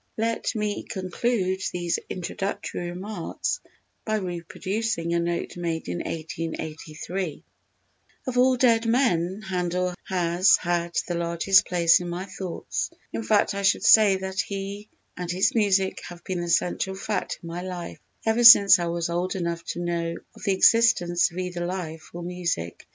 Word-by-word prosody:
Let 230 Hz, +1 st, -1 dB
me 210 Hz, -1 st, -2 dB
conclude 190 Hz, 0 st, -2 dB
these 175 Hz, -1 st, -1 dB
introductory 180 Hz, -1 st, -4 dB
remarks 190 Hz, -, -4 dB, 0.4 s
by 215 Hz, -, -1 dB
reproducing 185 Hz, 0 st, -3 dB
a 170 Hz, -, +2 dB
note 170 Hz, 0 st, -2 dB
made 165 Hz, -2 st, -3 dB
in 90 Hz, 0 st, -3 dB
1883: 160 Hz, +1 st, -5 dB, 0.8 s
"Of 255 Hz, -, -3 dB
all 255 Hz, +1 st, +4 dB
dead 230 Hz, -2 st, +3 dB
men 215 Hz, -6 st, +1 dB
Handel 180 Hz, -1 st, -1 dB
has 180 Hz, 0 st, +3 dB
had 170 Hz, -1 st, -2 dB
the 175 Hz, -, -2 dB
largest 170 Hz, +3 st, +3 dB
place 170 Hz, -2 st, +4 dB
in 175 Hz, -1 st, -5 dB
my 175 Hz, +2 st, -4 dB
thoughts. 190 Hz, -2 st, -4 dB, 0.2 s
_In 225 Hz, -, -3 dB
fact 215 Hz, -2 st, +2 dB
I 200 Hz, -, -3 dB
should 195 Hz, -, +2 dB
say 210 Hz, -3 st, +7 dB
that 190 Hz, 0 st, -5 dB
he 200 Hz, +1 st, -4 dB, 0.3 s
and 180 Hz, -1 st, -5 dB
his 180 Hz, +2 st, +2 dB
music 195 Hz, -4 st, +1 dB
have 175 Hz, 0 st, -11 dB
been 185 Hz, -2 st, -3 dB
the 175 Hz, -, -4 dB
central 185 Hz, +3 st, 0 dB
fact 210 Hz, +2 st, -3 dB
in -, -, -8 dB
my 170 Hz, +1 st, -5 dB
life 180 Hz, -2 st, -6 dB, 0.3 s
ever 225 Hz, +2 st, +2 dB
since 200 Hz, -5 st, +10 dB
I 170 Hz, -, -1 dB
was 170 Hz, 0 st, -1 dB
old 175 Hz, +2 st, -2 dB
enough 170 Hz, -2 st, -3 dB
to -, -, -4 dB
know 170 Hz, -1 st, -2 dB, 0.2 s
of -, -, -14 dB
the 200 Hz, -, +2 dB
existence 190 Hz, -4 st, +4 dB
of 170 Hz, -, -13 dB
either 180 Hz, -1 st, -3 dB
life 170 Hz, -3 st, -5 dB
or 175 Hz, 0 st, -7 dB
music_. 170 Hz, -, -3 dB
180 Hz, 155 wpm, -25 LUFS, 170-200 Hz, 0.8 s, since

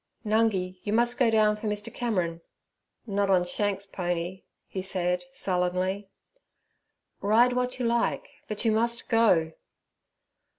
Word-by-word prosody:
'Nungi, 205 Hz, -4 st, +1 dB
you 205 Hz, -, -2 dB
must 240 Hz, +2 st, +2 dB
go 250 Hz, -3 st, +4 dB
down 215 Hz, -1 st, +3 dB
for 210 Hz, +1 st, -5 dB
Mr. 210 Hz, 0 st, -3 dB
Cameron.' 180 Hz, -9 st, -1 dB, 0.6 s
'Not 200 Hz, -2 st, 0 dB
on 185 Hz, -2 st, +4 dB
Shanks's 200 Hz, +2 st, -1 dB
pony' 175 Hz, 0 st, -3 dB, 0.2 s
he 190 Hz, -, -5 dB
said 180 Hz, +2 st, -1 dB
sullenly. 185 Hz, -2 st, -1 dB, 1.1 s
'Ride 230 Hz, +5 st, +4 dB
what 250 Hz, 0 st, -1 dB
you 250 Hz, -, -2 dB
like, 235 Hz, 0 st, 0 dB, 0.2 s
but 215 Hz, +2 st, -4 dB
you 225 Hz, -, +4 dB
must 235 Hz, +2 st, +1 dB
go.' 210 Hz, -9 st, +3 dB
205 Hz, 130 wpm, -27 LUFS, 185-230 Hz, 1.1 s, go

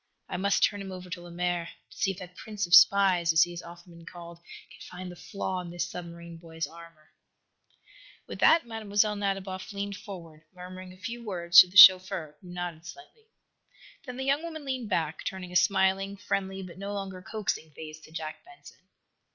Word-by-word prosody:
I -, -, -5 dB
must 200 Hz, +2 st, +1 dB
turn 205 Hz, -1 st, +2 dB
him 195 Hz, -1 st, -7 dB
over 180 Hz, -1 st, -9 dB
to 180 Hz, -1 st, -5 dB
Lemaire 175 Hz, 0 st, -3 dB, 0.2 s
to -, -, -15 dB
see 195 Hz, -, 0 dB
if 195 Hz, -, -4 dB
that 180 Hz, -2 st, -10 dB
prince 210 Hz, -1 st, -4 dB
of 175 Hz, -, -6 dB
spies, 185 Hz, -3 st, +6 dB
as 160 Hz, +1 st, +6 dB
he 175 Hz, -, -4 dB
has 175 Hz, 0 st, -7 dB
often 170 Hz, 0 st, -13 dB
been 170 Hz, -, -14 dB
called, 170 Hz, -1 st, -11 dB, 0.3 s
can -, -, -15 dB
find 180 Hz, 0 st, -8 dB
the -, -, -11 dB
flaw 190 Hz, 0 st, -4 dB
in 175 Hz, -, -9 dB
this 175 Hz, 0 st, -3 dB
submarine 170 Hz, -1 st, -9 dB
boy's 165 Hz, -1 st, -6 dB
armor." 165 Hz, 0 st, -15 dB, 1.1 s
With -, -, -9 dB
that 325 Hz, -4 st, +5 dB
Mlle. 225 Hz, -1 st, -7 dB, 0.3 s
Nadiboff 195 Hz, -1 st, -4 dB
leaned 200 Hz, 0 st, -4 dB
forward, 170 Hz, -5 st, -11 dB
murmuring 185 Hz, +1 st, -10 dB
a 185 Hz, -, -15 dB
few 230 Hz, +6 st, -7 dB
words 175 Hz, -5 st, +5 dB
to -, -, +9 dB
the 185 Hz, +3 st, -5 dB
chauffeur, 185 Hz, -4 st, +8 dB
who 180 Hz, -, -14 dB
nodded 175 Hz, -2 st, -6 dB
slightly. 435 Hz, +5 st, -14 dB, 0.8 s
Then 250 Hz, -2 st, -8 dB
the 265 Hz, -, -4 dB
young 280 Hz, +2 st, +2 dB
woman 320 Hz, -3 st, -7 dB
leaned 260 Hz, -5 st, -4 dB
back, 160 Hz, -1 st, -2 dB
turning 185 Hz, -2 st, -6 dB
a -, -, -9 dB
smiling, 195 Hz, +2 st, +2 dB
friendly 195 Hz, -1 st, -3 dB
but 180 Hz, 0 st, -11 dB
no 200 Hz, +1 st, -5 dB
longer 190 Hz, -2 st, -6 dB
coaxing 195 Hz, -5 st, -4 dB
face 155 Hz, +1 st, -10 dB
to 155 Hz, -, -17 dB
Jack 160 Hz, -1 st, -7 dB
Benson. 360 Hz, 0 st, -16 dB
185 Hz, 195 wpm, -28 LUFS, 170-200 Hz, 1.1 s, to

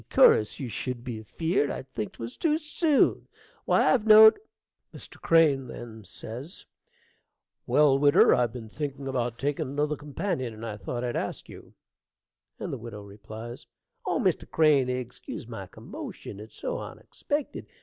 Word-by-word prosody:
cur'us 105 Hz, -, +5 dB
you 135 Hz, -, -4 dB
should 120 Hz, +2 st, -4 dB
be 120 Hz, -4 st, -5 dB
afeard 160 Hz, -, -1 dB
I'd 130 Hz, -, -5 dB
think 105 Hz, -, -4 dB
'twas 115 Hz, +1 st, -7 dB
too 310 Hz, -2 st, +1 dB
soon. 305 Hz, -1 st, +1 dB, 0.4 s
Why, -, -, +4 dB
I've 230 Hz, -4 st, 0 dB
knowed 220 Hz, -, +9 dB, 0.6 s
Mr. -, -, -11 dB
Crane 150 Hz, -6 st, +4 dB, 2.0 s
Well, 145 Hz, -2 st, +4 dB
widder, 145 Hz, 0 st, +6 dB
I've 120 Hz, -2 st, +2 dB
been 115 Hz, -2 st, -8 dB
thinking 140 Hz, +2 st, -5 dB
about 120 Hz, -3 st, -2 dB
taking 145 Hz, +2 st, -1 dB
another 145 Hz, +3 st, -1 dB
companion, 145 Hz, -, -3 dB
and 110 Hz, +2 st, -8 dB
I 105 Hz, -2 st, -5 dB
thought 120 Hz, +4 st, -4 dB
I'd 120 Hz, -1 st, -2 dB
ask -, -, -4 dB
you -, -, -13 dB, 0.8 s
Widow 115 Hz, -5 st, -6 dB, 1.0 s
Oh, -, -, +1 dB
Mr. -, -, 0 dB
Crane, 150 Hz, -5 st, +4 dB
egscuse 125 Hz, -1 st, -5 dB
my -, -, -7 dB
commotion; 100 Hz, -, -9 dB
it's 110 Hz, +2 st, -11 dB
so -, -, -3 dB
onexpected. 290 Hz, -1 st, -5 dB
135 Hz, 135 wpm, -27 LUFS, 120-160 Hz, 2.0 s, knowed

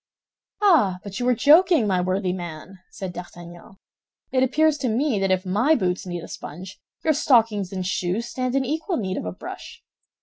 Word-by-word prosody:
"Ah, 265 Hz, -, +4 dB
but 200 Hz, +2 st, -7 dB
you 245 Hz, -, -1 dB
are 250 Hz, -, +3 dB
joking, 320 Hz, -, +5 dB
my 185 Hz, -3 st, +1 dB
worthy 185 Hz, 0 st, -1 dB
man!" 175 Hz, +1 st, -8 dB
said 190 Hz, -2 st, -7 dB
D'Artagnan. 175 Hz, 0 st, -11 dB, 0.6 s
"It 255 Hz, -, +2 dB
appears 305 Hz, +3 st, +2 dB
to 255 Hz, -, -1 dB
me 235 Hz, 0 st, 0 dB
that 195 Hz, 0 st, 0 dB
if 185 Hz, 0 st, +1 dB
my 240 Hz, +12 st, +3 dB
boots 185 Hz, -5 st, -1 dB
need 175 Hz, -2 st, -5 dB
a -, -, -8 dB
sponge, 180 Hz, +5 st, -9 dB, 0.2 s
your 315 Hz, -, +3 dB
stockings 225 Hz, -9 st, +2 dB
and 185 Hz, -2 st, -4 dB
shoes 185 Hz, +4 st, -1 dB
stand 255 Hz, +1 st, -3 dB
in 270 Hz, -1 st, +1 dB
equal 320 Hz, +7 st, -2 dB
need 190 Hz, -4 st, -3 dB
of -, -, -4 dB
a 90 Hz, -, -3 dB
brush. -, -, -10 dB
200 Hz, 190 wpm, -23 LUFS, 180-260 Hz, 0.6 s, joking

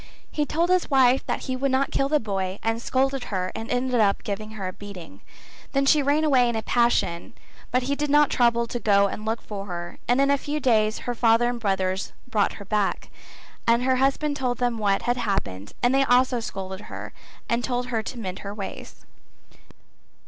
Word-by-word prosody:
He 295 Hz, -1 st, -1 dB
told 335 Hz, +5 st, +1 dB
his 365 Hz, -1 st, +2 dB
wife 265 Hz, -2 st, +4 dB
that -, -, -1 dB
he 260 Hz, -, -3 dB
would 275 Hz, +2 st, 0 dB
not 265 Hz, +1 st, +1 dB
kill 275 Hz, -, +1 dB
the 300 Hz, 0 st, +3 dB
boy 195 Hz, -4 st, -3 dB
and 225 Hz, +1 st, -1 dB
scolded 270 Hz, +1 st, 0 dB
her 185 Hz, -2 st, -2 dB
and 225 Hz, +1 st, -6 dB
ended 250 Hz, +1 st, 0 dB
by 200 Hz, -2 st, +4 dB
giving 215 Hz, +1 st, -5 dB
her 200 Hz, -3 st, -4 dB
a -, -, -9 dB
beating. 195 Hz, -5 st, -11 dB, 0.5 s
Then 275 Hz, 0 st, +2 dB
she 295 Hz, +2 st, +5 dB
ran 290 Hz, +3 st, +2 dB
away 260 Hz, -5 st, +4 dB
in 235 Hz, -, -2 dB
a 220 Hz, -, -2 dB
passion 235 Hz, -8 st, +1 dB, 0.4 s
but 255 Hz, +1 st, +1 dB
he 280 Hz, +3 st, 0 dB
did 295 Hz, 0 st, -2 dB
not 295 Hz, 0 st, +4 dB
trouble 235 Hz, -1 st, +3 dB
to 240 Hz, +1 st, -4 dB
go 200 Hz, -3 st, +4 dB
and 210 Hz, +2 st, -4 dB
look 225 Hz, +1 st, -2 dB
for 200 Hz, -1 st, -6 dB
her 175 Hz, -1 st, -6 dB
and 245 Hz, +2 st, +3 dB
in 275 Hz, 0 st, +4 dB
a 280 Hz, -, +2 dB
few 295 Hz, +2 st, -3 dB
days 220 Hz, -5 st, +2 dB
her 245 Hz, -, -1 dB
father 230 Hz, 0 st, +3 dB
and 245 Hz, -1 st, -3 dB
brothers 190 Hz, -2 st, -1 dB
brought 215 Hz, -5 st, +1 dB
her 200 Hz, -, -10 dB
back, 210 Hz, 0 st, -1 dB, 0.6 s
and 235 Hz, +1 st, +4 dB
her 260 Hz, 0 st, +2 dB
husband 275 Hz, +3 st, +1 dB
told 250 Hz, -3 st, -1 dB
them 245 Hz, -2 st, -1 dB
what 200 Hz, -2 st, +1 dB
had 245 Hz, +1 st, 0 dB
happened 195 Hz, -, -3 dB
and 245 Hz, +1 st, +4 dB
they 270 Hz, 0 st, +4 dB
also 250 Hz, 0 st, +3 dB
scolded 190 Hz, -3 st, -6 dB
her -, -, -8 dB, 0.3 s
and 235 Hz, +1 st, 0 dB
told 245 Hz, -1 st, -2 dB
her 230 Hz, -2 st, 0 dB
to 240 Hz, -, -7 dB
mend 190 Hz, -5 st, -5 dB
her 200 Hz, 0 st, -7 dB
ways. 200 Hz, -2 st, -8 dB
235 Hz, 210 wpm, -25 LUFS, 205-265 Hz, 0.6 s, she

